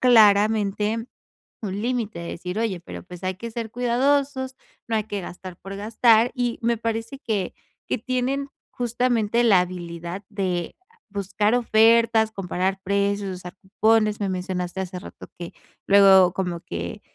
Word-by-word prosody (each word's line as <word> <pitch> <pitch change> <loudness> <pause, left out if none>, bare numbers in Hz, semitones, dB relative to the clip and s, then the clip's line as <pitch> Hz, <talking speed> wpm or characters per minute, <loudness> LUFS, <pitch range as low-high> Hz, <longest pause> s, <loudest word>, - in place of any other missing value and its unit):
claramente 215 -1 +4 0.6
un 200 -1 -3
límite, 230 -6 -2
de 170 - -6
decir: 180 +3 -5
"Oye, 215 -6 -1
pero 90 - -9
pues 180 - -11
hay 185 0 -1
que 230 +4 -7
ser 230 0 -4
cuidadosos, 260 +2 +1 0.3
no 225 - 0
hay 215 - +1
que 205 -1 -4
gastar 180 0 -9
por 195 +1 -8
gastar" 225 +3 +3
y 245 -3 -2
me 235 0 +1
parece 230 +3 -3
que 210 -9 -2 0.4
que - - +1
tienen 255 +3 -1 0.2
justamente 240 -1 +1
la 205 -6 +6
habilidad 175 +1 -6
de 185 -5 -2 0.3
buscar 205 +2 0
ofertas, 230 -1 +4
comparar 190 -1 -2
precios, 200 -1 0
usar 180 -1 -9
cupones. 215 +2 +2
Me 200 - 0
mencionaste 180 0 -3
hace 185 -1 -5
rato - - -11
que 170 -1 -7 0.3
luego 195 -2 +7
como 180 -3 -2
que, 85 0 -6
210 Hz, 145 wpm, -24 LUFS, 185-230 Hz, 0.6 s, luego